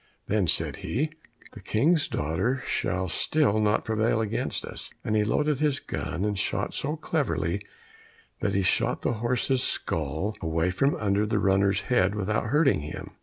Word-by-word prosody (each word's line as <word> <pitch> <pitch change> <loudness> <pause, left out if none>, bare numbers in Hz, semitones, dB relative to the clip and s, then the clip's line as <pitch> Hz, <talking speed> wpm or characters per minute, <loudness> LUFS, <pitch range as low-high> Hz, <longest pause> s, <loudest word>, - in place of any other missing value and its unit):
Then 100 -3 +1
said - - +3
he, 150 +7 -2 0.4
"The 115 - -10
King's 145 - +2
daughter 95 - -1
shall 95 +1 -1
still 110 - +2
not 105 -1 +2
prevail 110 0 +1
against 110 0 -2
us;" - - -7
and 110 - -1
he 105 - +3
loaded 150 +6 +1
his 145 -2 +1
gun, 90 -7 -4
and 105 -2 -1
shot - - -1
so 150 +3 -1
cleverly, 160 - -1 0.8
that 100 - -1
he 100 - +2
shot 90 - +1
the - - +1
horse's 125 +2 +1
skull 80 - -1
away 80 +2 0
from 135 +10 +1
under 105 0 +1
the - - 0
runner's 100 0 +2
head 100 -5 +1
without 105 +1 -1
hurting 145 - +3
him. 75 +1 -7
105 Hz, 165 wpm, -27 LUFS, 95-130 Hz, 0.8 s, said